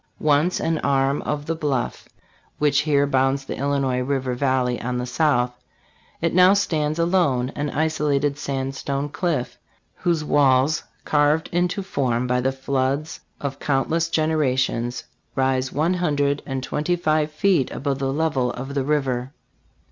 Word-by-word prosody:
Once 155 +4 +2
an 165 -1 0
arm 135 0 +1
of 150 0 -2
the 165 - -1
bluff, 145 -6 -2 0.5
which 145 -1 +3
here 145 -1 +2
bounds 135 0 +1
the - - -4
Illinois 135 -2 0
river 130 0 -1
vallay 130 -2 0
on 125 +1 -2
the 125 - -2
south, 125 -2 +1 0.7
it 165 0 0
now 185 +2 +6
stands 155 -6 0
alone, 165 -8 +2
an 145 0 -2
isolated 145 -2 0
sandstone 135 0 -3
cliff, 145 -6 -2 0.4
whose 170 -4 0
walls, 140 0 +3 0.2
carved 150 +2 +2
into 180 +3 0
form 125 -9 -1
by 125 0 +1
the 130 +1 +1
floods 135 +3 -2 0.2
of 140 -1 -4
countless 160 +4 0
generations, 130 -6 0 0.3
rise 130 -1 +1
one 160 +5 +1
hundred 145 -5 0
and 135 -2 -3
twen 150 - -3
ty 175 +3 +1
five 155 -3 +1
feet 165 -4 +2
above 140 0 -3
the 135 0 -1
level 140 -4 0
of 135 +3 -6
the 140 -1 0
river. 135 -3 -1
140 Hz, 150 wpm, -23 LUFS, 130-155 Hz, 0.7 s, now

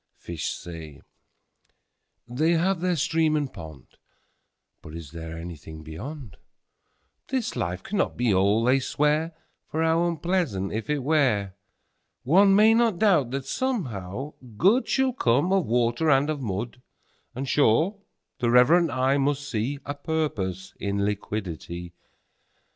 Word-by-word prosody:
5Fish 85 -3 -6
say, 80 -4 -6 1.3
they 155 +8 +1
have 175 +2 +1
their 180 -1 +1
Stream 160 +1 +1
and 145 -3 -2
Pond;6But 80 0 -15
is 80 -4 -8
there 80 0 -7
anything 80 -2 -9
Beyond?7This 140 - -8
life 90 +2 -3
cannot 205 - -1
be 120 -4 +2
All, 100 +4 +3
they 130 +3 +4
swear,8For 155 +3 -2
how 165 +1 +2
unpleasant, 165 - -1
if 110 0 -4
it 150 -3 0
were!9One 135 - +1
may 215 +2 +6
not 230 -4 +2
doubt 170 - +3
that, 135 +1 -4
somehow, 135 - -3 0.2
Good10Shall 255 - +2
come 140 +11 +2
of 190 -4 +2
Water 120 +6 +1
and 145 +2 +3
of 145 -2 -4
Mud;11And, 120 +4 -7
sure, 150 - +2 0.4
the 120 - +1
reverent 150 +9 +5
eye 130 +2 +1
must 140 0 -1
see12A 140 +5 -3
Purpose 95 - -2
in 100 0 -1
Liquidity. 90 -4 -4
135 Hz, 115 wpm, -25 LUFS, 100-160 Hz, 1.3 s, may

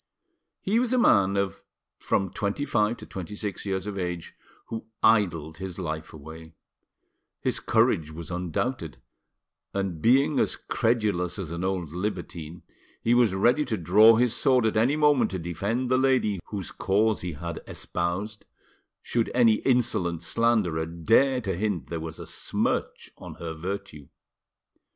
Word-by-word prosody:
He 215 +4 +1
was 250 0 0
a - - +3
man 100 - +4
of 100 0 -2 0.4
from 95 -2 0
twenty 100 +8 -2
five 115 -3 +1
to - - -10
twenty 95 +2 -7
six 105 -1 -5
years 95 -1 -2
of 100 -2 -4
age, 90 -2 -4 0.4
who 110 -1 -6 0.2
idled 85 -8 +2
his 95 -1 -6
life 80 -4 -4
away: 80 +2 -11 0.8
his - - -1
courage 80 -1 +2
was 80 +2 -8
undoubted, 90 - -3 0.8
and 95 -5 -2
being 135 +5 +4
as - - +1
credulous 105 -7 0
as 85 -5 -5
an 85 +1 -4
old 95 -5 -2
libertine, 85 -3 -5 0.4
he 115 - +3
was 120 -6 +4
ready 120 +9 +3
to 115 -4 -2
draw 105 +6 +6
his 120 0 +2
sword 125 -2 +3
at 110 - +1
any 120 +7 +3
moment 150 -3 +3
to 95 - -3
defend 100 +9 -2
the 130 - +4
lady 130 -7 +2
whose 100 -4 -5
cause 105 +2 +1
he 90 -2 -4
had 85 +3 -6
espoused, 90 +5 -4 0.6
should 115 -1 0
any 115 -3 +5
insolent 105 -11 0
slanderer 90 -6 +1
dare 115 +11 +2
to 95 -5 -2
hint 100 -2 -2
there 85 - -2
was 80 0 -6
a - - -8
smirch - - -2
on - - -9
her 85 -1 -6
virtue. 90 -3 -6
100 Hz, 155 wpm, -26 LUFS, 85-115 Hz, 0.8 s, draw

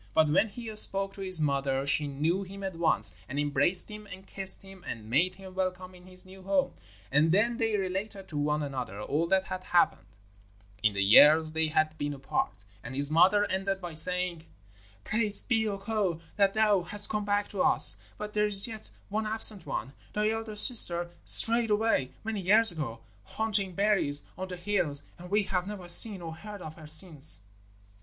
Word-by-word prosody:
But 155 -1 +1
when 210 +8 -1
he 225 +1 -11
spoke 195 -2 +5
to 195 - -13
his 185 -3 +4
mother 140 -2 -3
she 145 +1 -1
knew 155 +7 -4
him 195 +1 -12
at 190 -2 -7
once, 170 0 -2 0.2
and 135 - -8
embraced 145 +7 -1
him 210 0 -13
and 190 +1 -13
kissed 195 0 -4
him, 195 -2 -17
and 110 -2 -10
made 165 +11 -2
him 190 -1 -15
welcome 185 0 -7
in 180 0 -19
his 185 0 -14
new 190 +1 -17
home. 190 0 -3 0.4
And 150 +4 0
then 230 +6 -1
they 225 -3 -3
related 195 +1 -7
to 150 - -9
one 150 +1 -3
another 125 -8 -8
all 150 +9 -4
that 190 +1 -1
had 185 -1 -9
happened 175 - -2 0.7
in 110 -1 -1
the 100 0 -3
years 155 +10 +4
they 160 0 -3
had 155 0 -3
been 145 0 -6
apart, 135 - -6 0.2
and 125 +2 -11
his 140 +2 -5
mother 190 +6 +1
ended 195 +1 -5
by 175 -3 -10
saying: 175 0 -1 0.6
'Praised 215 -2 -2
be 225 -3 -2
Ukko 195 -4 -5 0.2
that 200 0 -1
thou 210 -3 0
hast 205 +4 +2
come 210 -1 -5
back 205 0 -3
to 195 - -6
us; - - +4 0.2
but 210 0 -9
there 210 0 -2
is 200 0 +6
yet 220 -2 -3 0.2
one 215 +2 -5
absent 215 -4 +8
one 130 +4 -7 0.2
thy 210 +1 -3
eldest 220 -1 -2
sister 175 -8 +3
strayed 230 0 +6
away 210 - -2
many 220 -2 -6
years 215 +4 +2
ago, 130 -9 -9 0.2
hunting 200 - -5
berries 195 -8 +1
on 185 - -9
the 180 -1 -10
hills, 175 -7 -2 0.2
and 180 +1 -13
we 205 +2 -1
have 185 -1 -5
never 200 -4 -10
seen 190 +1 +11
or 165 -1 -9
heard 205 +3 -13
of 155 - -11
her 155 -2 -16
since.' 155 - -3
185 Hz, 195 wpm, -25 LUFS, 155-205 Hz, 0.7 s, seen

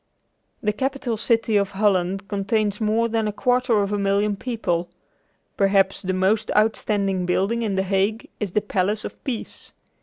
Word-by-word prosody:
The 210 -1 +1
capital 265 0 -2
city 225 -1 +1
of 200 -1 +1
Holland 195 -1 +1
contains 205 +1 -1
more 220 +2 +2
than 225 -1 0
a - - 0
quarter 245 -1 +2
of 200 +1 -2
a 205 - 0
million 200 +1 +1
people. 195 -7 -2 0.7
Perhaps 195 -1 +3
the 185 - -2
most 195 +4 +1
outstanding 200 -4 +1
building 195 +6 +1
in 210 -4 -1
The 190 - +1
Hague 195 +4 0
is 200 -4 -3
the 210 - +2
Palace 205 +1 -1
of - - -9
Peace. 245 -5 -6
210 Hz, 160 wpm, -23 LUFS, 195-225 Hz, 0.7 s, Perhaps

